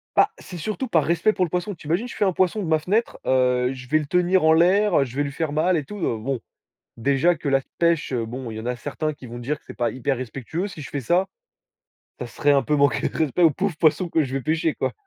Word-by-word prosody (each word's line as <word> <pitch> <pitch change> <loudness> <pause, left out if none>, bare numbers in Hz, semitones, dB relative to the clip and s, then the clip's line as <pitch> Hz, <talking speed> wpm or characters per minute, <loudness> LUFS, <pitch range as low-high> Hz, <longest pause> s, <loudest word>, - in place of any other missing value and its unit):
Bah, - - +4
c'est 180 - -9
surtout 215 +9 -3
par 160 -8 +2
respect 170 +6 +2
pour 185 - +1
le - - -7
poisson. 180 +4 -2
Tu 150 - -13
imagines, 185 +10 0
je - - -9
fais 205 - +1
un 190 - +1
poisson 185 +4 +1
de - - -4
ma 160 -1 +3
fenêtre, 210 +9 -1
heu, 125 -1 +2
je 125 -1 -10
vais 155 +3 +3
le 150 - -4
tenir 180 +2 +2
en 160 0 +6
l'air, 185 +3 +4
heu, 140 - +4
je 125 - -10
vais 145 - +1
lui 140 - -4
faire 155 +2 -3
mal 170 +3 +2
et 150 - -2
tout, 210 - -8
heu, 160 - -1
bon, 125 +4 -3 0.6
déjà 140 +8 +2
que 155 -2 -3
la 135 0 +3 0.2
pêche, 170 -4 +2
heu, 115 -2 -1
bon, 120 +1 -6
il 110 - -7
y - - -4
en 110 - -8
a 125 - -1
certains 150 +5 -3
qui 140 - -13
vont 120 0 -8
dire 140 +5 -2
que - - -32
c'est - - -9
pas 120 - 0
hyper 130 +1 -2
respectueux 135 - -4
si 175 -6 -9
je 140 - -8
fais 140 - -3
ça. 175 +9 +2 0.9
Ça - - -5
serait 145 - 0
un 140 -1 +4
peu 150 - 0
manquer 140 -6 +2
de - - -9
respect 160 +1 +1
au 165 - +7
pauvre 185 +2 -2
poisson 165 +3 +2
que 165 -1 +2
je 130 - -7
vais 135 - -2
pêcher, 160 +1 0
quoi. - - -2
155 Hz, 285 wpm, -23 LUFS, 135-175 Hz, 0.9 s, au